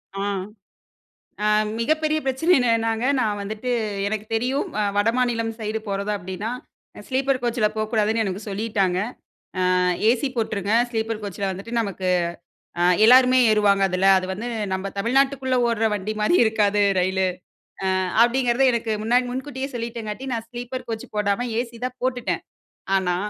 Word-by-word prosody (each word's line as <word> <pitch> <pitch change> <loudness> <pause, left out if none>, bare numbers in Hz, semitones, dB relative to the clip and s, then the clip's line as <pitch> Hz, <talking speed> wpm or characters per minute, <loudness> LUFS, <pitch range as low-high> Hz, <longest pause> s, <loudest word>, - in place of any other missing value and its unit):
ஆ, - - -4 1.3
அ - - +2 0.3
மிகப்பெரிய 310 +5 +1
பிரச்சனை 265 +7 +2
என்னதுனாங்க! 230 -2 +1 0.2
நான் 210 -3 0
வந்துட்டு 215 +5 -4 0.4
எனக்கு 215 0 -3
தெரியும் 250 +5 0
அ - - +2
வடமாநிலம் 230 +1 +1
சைடு 215 0 -2
போறதா 200 +1 -1
அப்டின்னா 190 +4 -5 0.6
ஸ்லீப்பர் 265 0 0
கோச்ல 235 -2 +1
போக்கூடாதுன்னு 220 0 +1
எனக்கு 195 -1 -3
சொல்லீட்டாங்க. 195 -3 0 0.8
அ - - +3 0.3
ஏசி 250 +3 +1
போட்ருங்க. 210 -3 -1 0.2
ஸ்லீப்பர் 225 -1 -2
கோச்ல 200 -1 -4
வந்துட்டு 195 +5 -7
நமக்கு 195 -4 -3 0.7
ஆ - - +3 0.2
எல்லாருமே 255 +2 +7
ஏறுவாங்க 205 -2 +3
அதுல. 185 +1 +1
அது 185 - -4
வந்து 220 +6 -5 0.2
நம்ப 190 +1 -2
தமிழ்நாட்டுக்குள்ள 260 +3 +1
ஓட்ற 225 -1 +1
வண்டி 205 +1 -3
மாரி 210 +12 +3
இருக்காது. 210 -2 +2 0.2
ரயிலு. 190 +1 +1 0.7
அ - - +1 0.2
அப்டிங்கிறத 245 +1 +2
எனக்கு 230 -1 -1
முன்னாடி 245 +3 +3
முன்கூட்டியே 265 +1 -4
சொல்லீட்டங்காட்டி, 230 0 -5
நான் 225 -1 -4
ஸ்லீப்பர் 245 +1 -6
கோச் 225 -1 -4
போடாம, 210 +3 0
ஏசி 235 -1 -6
தான் 255 0 -7
போட்டுட்டேன். 250 -2 -1 0.6
ஆனா, 180 -2 0
225 Hz, 135 wpm, -23 LUFS, 205-250 Hz, 1.3 s, எல்லாருமே